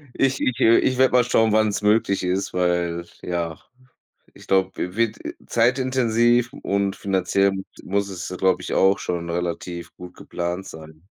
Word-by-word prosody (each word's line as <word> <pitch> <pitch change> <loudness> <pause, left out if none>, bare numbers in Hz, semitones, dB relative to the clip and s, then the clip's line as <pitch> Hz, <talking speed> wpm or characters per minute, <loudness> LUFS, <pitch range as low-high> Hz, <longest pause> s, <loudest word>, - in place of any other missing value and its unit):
Ich 135 0 +1
ich 125 - 0
äh, 115 - +5
ich 130 - +1
werde 130 0 +4
mal 125 -1 +5
schauen, 115 -2 +2
wann 110 0 +4
es 105 - -2
möglich 105 -2 +2
ist, 90 +2 -1
weil 85 -1 0 0.2
ja 85 -2 -3 0.7
ich - - -16
glaube, 95 -1 +2
wi 90 +1 -4
wird 115 -1 0 0.3
zeitintensiv 120 -1 +2
und 100 -6 -1
finanziell 100 0 +1
m 95 0 -4 0.2
muss 100 +1 -1
es 90 -2 -6
ja, 90 - -6
glaube 95 0 +2
ich - - -4
auch, 95 +1 +4
schon 85 -2 -4
relativ 85 0 -4
gut 90 0 -11
geplant 90 +2 -4
sein. 80 -2 -12
95 Hz, 170 wpm, -22 LUFS, 90-115 Hz, 0.7 s, äh